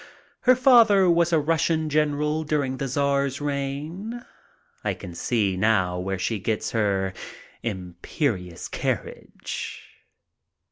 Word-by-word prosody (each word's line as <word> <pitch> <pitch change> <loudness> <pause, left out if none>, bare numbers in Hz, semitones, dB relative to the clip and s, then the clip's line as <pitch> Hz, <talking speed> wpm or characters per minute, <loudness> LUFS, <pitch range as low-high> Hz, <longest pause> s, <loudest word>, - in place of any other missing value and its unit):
Her 255 - +9
father 230 -7 +6
was 170 0 +3
a 165 - +4
Russian 160 +1 +1
general 150 +1 +1
during 145 -4 -1
the 135 - -2
Czar's 140 0 0
reign. 145 - -4 0.6
I - - -1
can 90 - -9
see 100 +1 0
now 95 -3 +2
where 95 +1 -2
she 105 +4 -1
gets 110 +2 -2
her 100 -4 0 0.5
imperious 90 - -3
carriage. - - -4
140 Hz, 110 wpm, -25 LUFS, 100-155 Hz, 0.6 s, Her